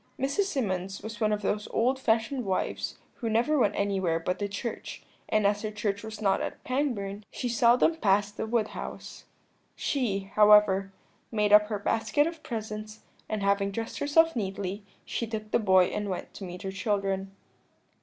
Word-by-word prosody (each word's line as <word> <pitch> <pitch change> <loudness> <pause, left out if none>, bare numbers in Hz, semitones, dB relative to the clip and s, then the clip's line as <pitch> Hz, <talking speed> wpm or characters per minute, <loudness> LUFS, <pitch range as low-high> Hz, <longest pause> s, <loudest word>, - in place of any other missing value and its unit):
"Mrs. 280 +10 +1
Symonds 195 - -2
was 220 +1 -7
one 215 -1 +3
of 210 -1 -1
those 210 +1 -1
old 255 +3 +1
fashioned 235 +2 +1
wives 190 -3 -2 0.2
who 230 - -3
never 240 +7 +2
went 205 -4 +2
anywhere 190 -5 +1
but 180 +2 -2
to 205 - -1
church, 200 +4 -6 0.3
and 215 -1 +2
as 205 +1 +2
her 215 - -2
church 205 -1 -2
was 220 -1 -8
not 195 -3 +2
at - - -5
Pangbourne 215 -7 -2
she 250 - -4
seldom 240 +6 +4
passed 205 -4 +2
the 220 - -3
Wood 220 -2 +1
House. - - -8 0.5
She, 200 -8 -1
however, 210 -2 +6 0.4
made 210 -2 +2
up 210 0 +8
her 210 -1 -2
basket 220 +7 +1
of 330 -1 -5
presents, 215 -3 -6 0.3
and 215 -2 -2
having 200 0 +2
dressed 225 +3 -5
herself 325 +3 +4
neatly, 195 -2 -3 0.2
she 230 - -3
took 215 -1 -5
the - - +3
boy 190 -4 +5
and 210 -1 -3
went 185 - -5
to 195 - -7
meet 180 0 -8
her 190 - -3
children. 195 -1 -2
210 Hz, 175 wpm, -28 LUFS, 195-230 Hz, 0.5 s, up